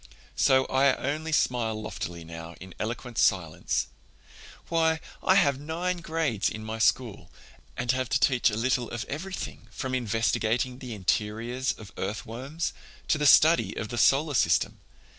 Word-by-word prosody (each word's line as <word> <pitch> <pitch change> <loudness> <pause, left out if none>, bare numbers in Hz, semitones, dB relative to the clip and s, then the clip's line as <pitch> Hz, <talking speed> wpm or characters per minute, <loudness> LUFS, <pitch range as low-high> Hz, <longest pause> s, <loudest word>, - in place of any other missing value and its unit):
So 130 0 +4
I 135 0 +3
only 155 +4 -3
smile 115 -7 +1
loftily 85 -5 -6
now 80 +1 -9
in 95 -1 -11
eloquent 120 +2 -4
silence. 85 -6 +1 0.8
Why, 160 -1 +2 0.2
I 190 - +4
have 140 -8 +3
nine 170 +5 -2
grades 160 - -1
in 110 0 -7
my 110 +1 -5
school 110 -7 +1 0.5
and 120 0 +1
I - - -1
have 130 -1 -2
to 125 - +2
teach 130 -2 +3
a 105 - -3
little 120 0 0
of 120 -1 -4
everything, 160 -6 -6
from 130 +3 -5
investigating 115 +1 0
the 125 -5 -6
interiors 115 +6 -1
of 105 -3 -12
earthworms 120 - -4 0.4
to 155 - +3
the 150 - +3
study 160 +4 +6
of 110 - -4
the 120 - -5
solar 145 +2 +4
system. 115 - +2
125 Hz, 155 wpm, -27 LUFS, 110-145 Hz, 0.8 s, study